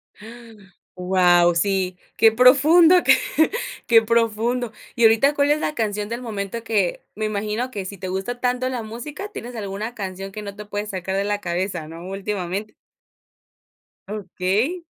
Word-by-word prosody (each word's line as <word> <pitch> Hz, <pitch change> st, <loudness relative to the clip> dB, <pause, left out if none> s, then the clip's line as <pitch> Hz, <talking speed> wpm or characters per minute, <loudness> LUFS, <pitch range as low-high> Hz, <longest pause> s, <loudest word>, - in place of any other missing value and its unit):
¡Ah!, 230 Hz, +1 st, -13 dB, 0.4 s
wao, 180 Hz, -1 st, +4 dB
sí, 185 Hz, 0 st, 0 dB, 0.2 s
qué 225 Hz, -, +6 dB
profundo, 290 Hz, +9 st, +6 dB, 0.9 s
que 230 Hz, -1 st, +6 dB
profundo, 230 Hz, +1 st, 0 dB, 0.2 s
¿y 235 Hz, -, 0 dB
ahorita 225 Hz, +6 st, +5 dB
cuál 285 Hz, 0 st, +2 dB
es 300 Hz, -, +2 dB
la 305 Hz, -, -2 dB
canción 210 Hz, -2 st, -2 dB
del 235 Hz, +2 st, -4 dB
momento 220 Hz, 0 st, -5 dB
que 205 Hz, -6 st, 0 dB
me 215 Hz, +1 st, -2 dB
imagino 215 Hz, +4 st, -2 dB
que 200 Hz, -6 st, -6 dB
si 200 Hz, +1 st, -7 dB
te 185 Hz, -, -5 dB
gusta 190 Hz, +7 st, -4 dB
tanto 250 Hz, +1 st, 0 dB
la 250 Hz, -3 st, -3 dB
música, 270 Hz, -, -7 dB
tienes 245 Hz, -, -8 dB
alguna 210 Hz, +2 st, -5 dB
canción 195 Hz, -3 st, -6 dB
que 210 Hz, -, -7 dB
no 200 Hz, -1 st, -7 dB
te 210 Hz, 0 st, -9 dB
puedes 205 Hz, +1 st, -4 dB
sacar 190 Hz, -1 st, -4 dB
de 195 Hz, -, +1 dB
la 205 Hz, 0 st, -1 dB
cabeza?, 175 Hz, -3 st, -3 dB
¿no? 165 Hz, +3 st, -9 dB
Últimamente. 195 Hz, +1 st, -4 dB, 1.4 s
Okey. 210 Hz, -, -2 dB
210 Hz, 155 wpm, -22 LUFS, 195-240 Hz, 1.4 s, qué